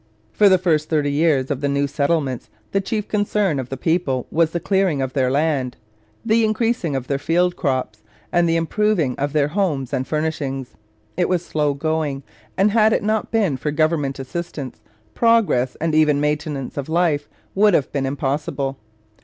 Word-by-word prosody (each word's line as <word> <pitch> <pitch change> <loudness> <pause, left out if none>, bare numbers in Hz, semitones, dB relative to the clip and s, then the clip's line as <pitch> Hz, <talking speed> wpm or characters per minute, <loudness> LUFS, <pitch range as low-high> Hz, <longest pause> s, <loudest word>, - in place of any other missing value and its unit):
For 205 - +5
the 190 - +5
first 160 -4 +1
thirty 150 -3 +1
years 145 -3 +2
of 140 -1 -2
the 145 - 0
new 140 0 +1
settlements 140 -2 -1 0.2
the 195 - +1
chief 210 +1 -3
concern 205 -6 0
of 130 -1 -5
the 135 - -4
people 145 -4 0
was 165 0 +3
the 170 - -3
clearing 190 -5 +1
of 130 -1 -2
their 130 -3 +1
land, 140 -2 0 0.5
the 230 0 +3
increasing 220 - 0
of 130 -2 -2
their 140 +1 -1
field 175 +4 +1
crops, 130 -8 -2 0.3
and 175 -1 +3
the 165 - +2
improving 165 - +1
of 145 +1 -1
their 145 -1 +1
homes 150 -8 -1
and 130 - -1
furnishings. 150 -4 -3 0.4
It 175 - +1
was 180 -1 0
slow 150 -3 0
going, 150 -2 -2 0.3
and 200 +2 +3
had 220 0 +4
it - - 0
not 215 0 0
been 200 - +1
for 150 - -3
government 150 -2 0
assistance, 135 -1 -6 0.3
progress, 225 - +2
and 165 0 -1
even 155 -2 +4
maintenance 150 -2 -2
of 140 +1 -4
life, 160 -3 +1 0.2
would 205 -1 +4
have 140 - 0
been 135 -2 -1
impossible. 140 0 -2
155 Hz, 180 wpm, -21 LUFS, 140-180 Hz, 0.5 s, For